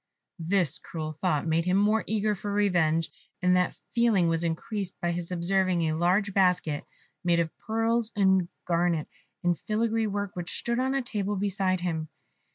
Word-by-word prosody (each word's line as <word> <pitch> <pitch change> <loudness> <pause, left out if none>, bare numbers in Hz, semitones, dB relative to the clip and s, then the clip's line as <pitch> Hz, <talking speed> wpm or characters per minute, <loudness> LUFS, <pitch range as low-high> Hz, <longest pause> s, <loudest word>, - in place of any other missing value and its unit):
This 170 -1 +1
cruel 155 -2 -5
thought 155 -1 0
made 165 +1 +1
him 180 +1 +2
more 210 +2 +3
eager 215 0 +1
for 205 +1 -5
revenge, 175 -6 +2 0.3
and 180 0 +3
that 180 -1 +1 0.2
feeling 230 -7 +3
was 165 0 +1
increased 185 +4 -3
by 175 -2 0
his 170 0 -4
observing 180 0 +1
a 155 -1 0
large 185 +5 +2
basket 180 -6 +2 0.4
made 170 -1 +3
of 165 -1 -1
pearls 225 +1 0
and 190 -3 +3 0.2
garnets 170 -2 0 0.3
in 175 0 +3
filigree 220 +5 0
work, 205 -1 -2
which 175 -1 -4
stood 235 +1 -1
on 265 +1 +1
a 270 - 0
table 205 -3 -2
beside 190 -2 0
him. 160 -3 -2
185 Hz, 165 wpm, -27 LUFS, 170-205 Hz, 0.4 s, more